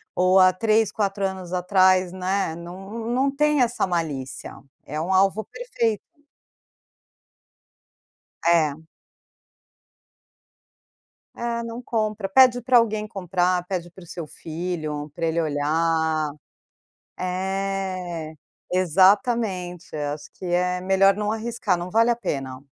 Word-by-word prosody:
ou 185 +1 +4
há 185 0 +7
3, 215 +1 +2
4 200 -2 -1
anos 190 -2 -5
atrás, 185 0 +3
né, 185 -2 -1
não 195 +7 -8
não 270 +3 +1
tem 300 -1 +3
essa 240 -4 +1
malícia, 155 -7 -3 0.3
é 150 +2 -4
um 180 +4 -1
alvo 195 +3 +3
perfeito. 230 - -2 2.5
É. 165 -4 +4 2.6
É, 235 0 -3
não 230 +1 -6
compra. 215 -4 -2
Pede 245 +4 +5
pra 250 +1 +4
alguém 215 -2 +1
comprar, 180 -3 0
pede 180 -2 -3
para 185 +1 -14
o - - -15
seu 165 -1 -7
filho, 155 -2 -5
pra 165 - -2
ele 165 +1 0
olhar. 160 +1 0 0.9
É. 185 -3 -3 0.4
Exatamente, 185 - +2
acho 145 0 -4
que - - -12
é 180 +1 0
melhor 195 +1 +4
não 210 +1 -2
arriscar, 225 -3 -1
não 175 +1 -6
vale 230 +2 +4
a 235 - +2
pena. 135 - -4
185 Hz, 115 wpm, -24 LUFS, 170-215 Hz, 2.6 s, há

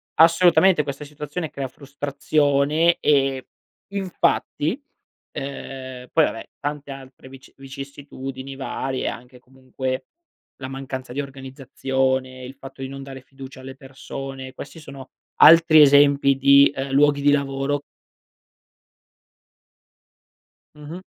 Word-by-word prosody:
assolutamente, 170 +1 +5
questa 140 0 -6
situazione 150 +2 -6
crea 135 -1 -4
frustrazione 145 +3 0
e 135 -3 +1 0.5
infatti 195 - -1 0.5
uhm, 130 -2 -7
poi 160 - +4
vabbè 115 - -6
tante 145 -1 -5
altre 135 -1 -12
vici 135 0 -15
vicissitudini 135 -1 -8
varie, 135 -1 -4
anche 125 +1 -7
comunque 130 0 -6 0.6
la 130 - -5
mancanza 130 -2 -7
di 140 - -2
organizzazione, 130 -1 -3
il 125 - -8
fatto 135 0 -12
di 130 - -5
non 135 0 -8
dare 135 -1 -9
fiducia 135 0 -12
alle 130 0 -9
persone; 135 0 -8
questi 145 +4 -10
sono 135 -3 -11 0.3
altri 165 -1 +8
esempi 140 -1 +5
di, 140 +1 +6
ehm, 135 0 -4
luoghi 145 +1 +3
di 145 0 +4
lavoro 140 0 -1 2.9
Mh-mh. 150 +5 -9
135 Hz, 110 wpm, -22 LUFS, 130-145 Hz, 2.9 s, altri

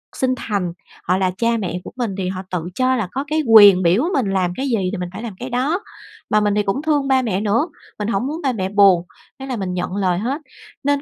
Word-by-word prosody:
sinh 255 -1 +1
thành, 190 -6 -2 0.3
họ 185 +1 +1
là 185 -1 +1
cha 230 0 +1
mẹ 180 -4 -3
của - - -9
mình 230 -7 -2
thì 185 -1 -2
họ 185 0 -4
tự 180 -3 -2
cho 255 0 +2
là 220 -6 -1
có 270 +2 -2
cái 310 +1 0
quyền 205 -5 +8
biểu 180 - +3
mình 240 -8 +1
làm 180 -2 0
cái 270 - -2
gì 235 -4 +1
thì 210 - -4
mình 180 -1 -4
phải 225 - -7
làm 225 -4 -5
cái 250 +2 -5
đó. 280 +10 0 0.5
Mà 215 - +3
mình 205 -1 +1
thì 210 - +2
cũng 200 +8 -1
thương 295 -3 +1
ba 265 -1 +3
mẹ 205 -5 -1
nữa, 225 - +1 0.3
mình 210 - -2
hổng 230 +4 -1
muốn 315 +4 -4
ba 265 -2 +1
mẹ 190 -3 -2
buồn, 195 -4 +5 0.4
thế 270 - -6
là 260 -2 -3
mình 185 -2 -3
nhận 180 +1 -3
lời 185 -3 +1
hết. 265 +9 -2 0.4
Nên 285 0 +1
210 Hz, 260 wpm, -20 LUFS, 190-260 Hz, 0.5 s, quyền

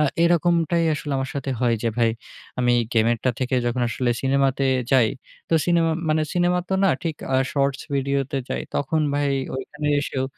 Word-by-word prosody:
আ - - +4 0.2
এরকমটাই 170 0 +2
আসলে 145 -1 -5
আমার 135 - -3
সাথে 140 -1 -3
হয় 120 -2 +3
যে 115 - +1
ভাই 115 -1 +3 0.5
আমি 125 -1 +3 0.2
game 115 -1 +3
এর 115 - -2
টা 130 - +4
থেকে 130 0 0
যখন 120 +1 0
আসলে 120 0 -1
সিনেমাতে 135 0 +1 0.3
যাই, 125 -4 +5 0.4
তো 165 - +2
সিনেমা 170 -2 +3 0.2
মানে 155 0 +2
সিনেমা 175 0 +2
তো 190 - 0
না 195 - +5
ঠিক 165 -4 -2 0.2
আ - - +5 0.2
shorts 140 -1 0
video 140 0 0
তে 140 - -1
যাই, - - -2
তখন 150 +3 0
ভাই 145 -1 +1 0.3
ঐখানে 150 +2 -4
এসেও 130 -2 -2
140 Hz, 190 wpm, -23 LUFS, 130-165 Hz, 0.5 s, যাই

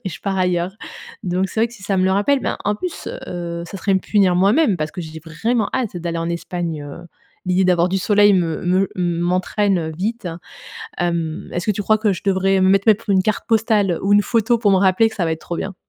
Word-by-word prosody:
et - - -2
je - - -9
pars 195 -1 -2
ailleurs. 180 +2 0 0.5
Donc 185 +1 0
c'est - - -6
vrai 230 - +4
que 235 - -16
si 205 -5 -14
ça 195 -1 -1
me 185 - +2
le 190 - +2
rappelle 235 +8 +2
ben, - - -2
en 205 0 0
plus, 360 +4 -5 0.2
heu, 170 -1 -5
ça 195 - -8
serait 195 +1 0
me - - +3
punir 190 -4 +2
moi-même 205 - +3
parce 155 0 -4
que 180 - -6
j'ai 160 -1 -8
vraiment 210 +7 -1
hâte 235 -8 -2
d'aller 170 -1 -3
en 165 0 -2
Espagne, 170 -3 -4
heu, 170 +4 -10 0.4
l'idée 185 +1 +2
d'avoir 180 -1 +3
du 190 +1 0
soleil 205 +1 +4
me 165 -4 0
me 185 +2 +2
m'entraîne, 180 +3 0
heu, 160 0 -4
vite, 215 -1 -3 0.7
hem, 170 -1 -2
est-ce 175 +2 -3
que 210 - +3
tu 205 +1 -4
crois 215 +2 +3
que 210 -2 +1
je - - -9
devrais, 190 0 +2
mettre 195 +3 +3
mettre 215 0 +3
une 190 -1 +4
carte 215 0 -1
postale 210 -5 +2
ou 200 +1 +3
une 205 - +5
photo 230 +1 +1
pour 215 -3 +2
me 190 - +4
rappeler 195 +4 +3
que - - -11
ça 175 -4 -1
va 160 - 0
être 160 - -5
trop 170 - -5
bien? 195 - -4
190 Hz, 245 wpm, -20 LUFS, 175-205 Hz, 0.7 s, une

